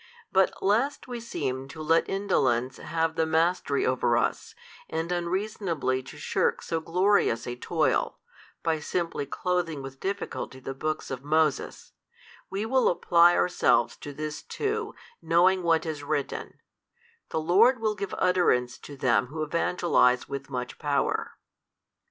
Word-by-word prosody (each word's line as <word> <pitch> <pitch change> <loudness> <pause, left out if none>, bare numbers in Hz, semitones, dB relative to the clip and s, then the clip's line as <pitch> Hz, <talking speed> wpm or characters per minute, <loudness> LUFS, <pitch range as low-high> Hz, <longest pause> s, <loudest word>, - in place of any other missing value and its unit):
But 190 0 +2
lest 235 +10 +1
we 245 -1 -5
seem 135 - -4
to 150 +3 -11
let 165 +2 +2
indolence 130 -11 +1
have 165 0 -1
the 160 0 0
mastery 160 -2 +1
over 125 -2 +2
us, - - -1 0.3
and 160 +2 -3
unreasonably 175 -6 -1
to 130 +3 -12
shirk 150 - 0
so 165 - -2
glorious 175 - +2
a 120 - -4
toil, 155 +5 0 0.5
by 160 -2 +1
simply 165 -2 -2
clothing 165 -3 -2
with 135 0 -9
difficulty 195 -8 -4
the 135 +1 -6
books 155 +2 -3
of 130 0 -5
Moses, 155 -1 0 0.6
we 195 +3 -2
will 260 +3 +3
apply 175 0 +5
ourselves 120 -9 +2
to 145 - -8
this 150 +1 -5
too, 435 +1 -3 0.3
knowing 180 +3 +3
what 165 -1 +2
is 155 -3 -4
written, 145 -1 -3 0.7
The - - -1
Lord 200 +11 +4
will 215 -1 0
give 200 -2 -5
utterance 175 -10 +2
to 145 - -11
them 125 -1 +2
who 155 +4 -4
evangelize 155 -5 +2
with 140 0 -6
much 125 -2 -5
power. 145 -2 -1
160 Hz, 140 wpm, -27 LUFS, 140-180 Hz, 0.7 s, apply